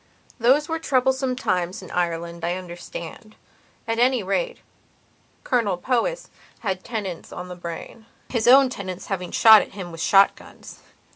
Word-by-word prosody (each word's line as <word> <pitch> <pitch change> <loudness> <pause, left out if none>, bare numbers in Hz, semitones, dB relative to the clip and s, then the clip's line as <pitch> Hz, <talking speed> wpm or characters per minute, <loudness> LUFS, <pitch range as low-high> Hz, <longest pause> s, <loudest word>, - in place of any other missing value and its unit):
Those 265 +6 +3
were 325 -1 -2
troublesome 265 -3 +1
times 185 -6 -2
in 185 - -11
Ireland, 170 -1 -2
I 175 +1 0
understand. 180 +3 -9 0.5
At 225 0 -1
any 250 -2 +3
rate, 475 - -1 0.9
Colonel 220 -7 0
Powys 255 - -1 0.3
had 190 -4 -3
tenants 205 -8 -5
on 180 0 -7
the 180 - -7
brainhis 220 +7 -6
own 265 +1 +7
tenants 185 -5 -6
having 180 -2 -4
shot 220 -2 +7
at - - -8
him 185 -3 -7
with 165 0 -8
shot 195 +2 +5
guns. - - -14
200 Hz, 145 wpm, -23 LUFS, 180-250 Hz, 0.9 s, own